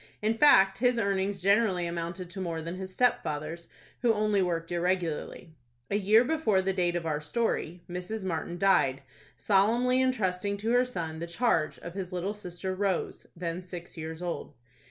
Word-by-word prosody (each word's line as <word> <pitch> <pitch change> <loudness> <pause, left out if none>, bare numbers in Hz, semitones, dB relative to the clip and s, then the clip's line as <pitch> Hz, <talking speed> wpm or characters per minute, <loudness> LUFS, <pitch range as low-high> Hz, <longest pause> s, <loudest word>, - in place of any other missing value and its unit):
In 215 +2 +1
fact, 195 -8 +6
his 250 0 +3
earnings 195 -3 0
generally 200 -3 +3
amounted 170 +2 -4
to 190 - -6
more 170 -3 -3
than 165 +2 -5
his 190 0 -6
stepfather's, 170 -7 -1 0.3
who 240 -2 +4
only 210 -1 +2
worked 170 -2 -1
irregularly. 175 -1 -2 0.4
A - - +2
year 210 +3 +5
before 255 -8 +1
the 190 0 0
date 175 -2 +1
of 170 -1 -2
our 150 -2 -1
story, 175 0 -2
Mrs. 180 +4 -5
Martin 175 0 -3
died, 140 -9 +3 0.3
solemnly 235 +6 +3
intrusting 200 -6 0
to 220 +3 -2
her 245 +1 +4
son 165 -9 -5
the 170 - -4
charge 170 -3 +1
of 170 - -8
his 190 -1 -5
little 180 +3 -2
sister 185 -2 -5
Rose, 190 -1 -2
then 170 0 -4
six 175 -1 -9
years 160 +1 -6
old. 175 -1 -4
185 Hz, 170 wpm, -29 LUFS, 170-210 Hz, 0.4 s, fact